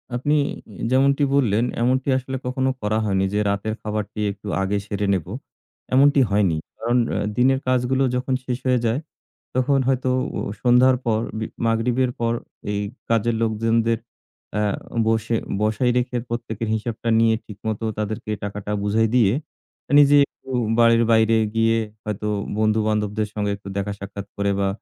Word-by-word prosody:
আপনি 145 +5 +1 0.6
যেমনটি 140 +2 +3
বললেন, 115 -5 +2 0.2
এমনটি 130 +2 +1
আসলে 130 0 -4
কখনো 130 +1 0
করা 105 +1 0
হয়নি 95 -2 +1
যে 105 - +1
রাতের 100 +2 -1
খাবারটি 105 0 -4
একটু 100 +1 -11
আগে 95 +1 0
সেরে 100 0 -2
নেব। 90 -5 -1 0.7
এমনটি 140 +1 +5
হয়নি। 100 -6 +2 0.2
কারণ 120 +2 +1
অ্যা - - -1 0.2
দিনের 135 +2 +4
কাজগুলো 130 +1 +2
যখন 130 +1 -1
শেষ 125 -2 -2
হয়ে 125 -1 +3
যায়, 115 +4 +1 0.6
তখন 135 +2 +2
হয়তো 130 -1 +1 0.3
ও - - -2 0.2
সন্ধ্যার 125 +1 +5
পর, 110 -2 +2 0.2
বি 110 - -2 0.2
মাগরিবের 125 +3 +1
পর 115 0 +1 0.4
এই 100 - -1 0.3
কাজের 115 0 +2
লোকজনদের 115 +1 +1 0.6
অ্যা 105 0 +1 0.4
বসে 110 +1 +1 0.3
বসায় 110 +4 +2
রেখে 125 0 0
প্রত্যেকের 115 -2 -4
হিসাবটা 115 +1 -3
নিয়ে 115 0 +4
ঠিকমতো 110 +1 -4
তাদেরকে 110 0 -3
টাকাটা 105 0 -5
বুঝাই 110 +2 +2
দিয়ে, 110 -4 +4 0.7
নিজে 145 0 +6
একটু - - -19 0.3
বাড়ির 115 0 +5
বাইরে 110 0 +4 0.2
গিয়ে 115 0 +3 0.3
হয়তো 105 0 -3 0.3
বন্ধু-বান্ধবদের 110 -1 +1
সঙ্গে 105 -1 -1
একটু 100 - -13
দেখা 100 +1 -2
সাক্ষাৎ 100 0 -7
করে, 100 0 +1
বা 100 - +1
115 Hz, 150 wpm, -22 LUFS, 105-125 Hz, 0.7 s, নিজে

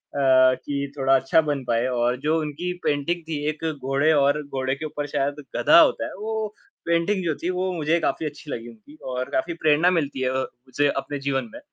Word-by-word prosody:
कि 135 +1 +2
थोड़ा 135 0 +3
अच्छा 135 +4 +3
बन 140 -2 -1
पाए 120 0 +1
और 125 0 0
जो 160 +1 +3
उनकी 155 +4 -3
पेंटिंग 150 +4 0
थी 155 -2 -2
एक 155 +1 -5 0.2
घोड़े 135 +4 +2
और 145 0 +3
घोड़े 135 -2 -2
के 155 +3 -6
ऊपर 145 -1 -4
शायद 145 +1 -1
गधा - - +6
होता - - +4
है, - - -6
वो 220 0 -3 0.3
पेंटिंग 170 +4 +1
जो 155 -3 0
थी, 175 - 0
वो 185 +1 -1
मुझे 160 +2 +1
काफ़ी 160 - -1
अच्छी 150 0 -7
लगी 115 0 -5
उनकी 115 +6 -16 0.2
और 125 0 -3
काफ़ी 170 +6 -1
प्रेरणा 160 +2 +3
मिलती 145 -6 -1
है 130 - +1
अ, 130 0 0
मुझे 130 +4 -2
अपने 145 +1 -3
जीवन 135 +10 -1
में 290 - -8
145 Hz, 205 wpm, -24 LUFS, 135-165 Hz, 0.3 s, गधा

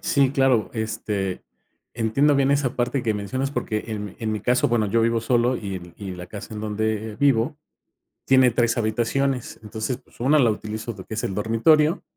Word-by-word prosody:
Sí, 140 -2 +2
claro. 135 -5 +2
Este, 110 -4 -3 0.5
entiendo 120 +6 +2
bien 140 0 +3
esa 140 -3 +1
parte 125 +2 0
que 110 -2 0
mencionas 130 +7 -2
porque, 110 -6 -2
en 105 -2 -4
mi 100 - -9
en 110 -1 -2
mi 105 - -3
caso, 125 +4 +2
bueno, 115 -3 +1
yo 115 +3 +2
vivo 115 0 +2
solo 120 +2 +2
y 95 -5 -6
y 100 -2 -6
la 90 0 -8
casa 105 +3 -8
en 105 - -5
donde 110 0 -2
vivo 140 0 +2 0.7
tiene 130 -1 +5
3 115 0 +1
habitaciones. 120 +4 -1
Entonces, 110 +3 -4
pues, - - -25
una 140 +5 +4
la 120 -5 +4
utilizo, 110 +2 -5
lo 95 - -9
que - - -7
es 115 - -2
el 95 - -2
dormitorio, 150 - +3
115 Hz, 190 wpm, -23 LUFS, 105-130 Hz, 0.7 s, tiene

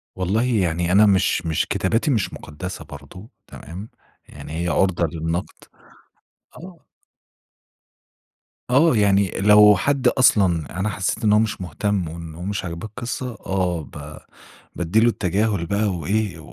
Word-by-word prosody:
والله 95 +5 0
يعني 90 -8 0
أنا 105 +3 +6
مش 95 -4 +2
مش 80 -2 0
كتاباتي 115 +10 0
مش 110 -7 -1
مقدسّة 90 +5 -8
برضه، 75 +8 -12 0.2
تمام، 95 +8 -10 0.4
يعني 75 - -10
هي - - -2
عُرضة 90 -1 +1
للنقد، 80 +2 -3 1.0
آه. 175 -1 -13 1.9
آه، 140 +2 +4
يعني 100 -3 +2
لو 105 +1 +7
حد 140 +6 0
أصلًا 90 - +2
أنا 105 +2 0
حسيت 100 +4 -2
إن 105 -1 +4
هو 105 - +5
مش 110 -3 -1
مهتم 90 +2 -2
وإن 80 0 -8
هو 85 - -10
مش 100 -1 -3
عاجباه 85 +5 -6
القصّة، 120 +1 -6
آه، 90 -3 -1
ب 75 +1 -10 0.6
بادّي 90 +6 +1
لُه 120 +1 +4
التجاهل 100 -2 -1
بقى 100 +4 0
و 90 -6 -3
إيه 100 -4 -1
95 Hz, 140 wpm, -21 LUFS, 85-110 Hz, 1.9 s, لو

